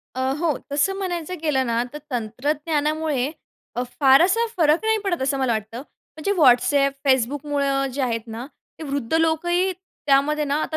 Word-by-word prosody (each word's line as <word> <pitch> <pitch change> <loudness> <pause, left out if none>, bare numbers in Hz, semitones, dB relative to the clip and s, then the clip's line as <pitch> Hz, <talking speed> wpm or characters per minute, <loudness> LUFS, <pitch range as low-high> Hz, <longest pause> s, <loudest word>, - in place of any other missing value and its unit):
अ, 260 - -3 0.2
हो. 325 -2 0 0.2
तसं 295 +7 +1
म्हणायचं 360 -3 -3
गेलं 270 -5 +1
ना, 235 0 +1
तर 300 - -6
तंत्रज्ञानामुळे 290 +4 -1 0.4
अ, 245 - -1 0.2
फार 270 -1 +7
असा 455 +6 +2
फरक 320 +3 +3
नाही 440 0 +2
पडत 350 -8 -1
असं 275 +1 0
मला 260 -3 +1
वाटतं, 220 +3 -4 0.3
म्हणजे 315 +6 -1
WhatsApp, 275 0 +4
Facebookमुळं 275 +1 +1
जे 280 - -3
आहेत 230 -3 0
ना, 230 +2 -7 0.3
ते 320 - -7
वृद्ध 280 -2 -3
लोकही 345 +3 +1
त्यामध्ये 300 -5 0
ना 285 0 0
आता 315 - -3
290 Hz, 160 wpm, -22 LUFS, 260-320 Hz, 0.4 s, फार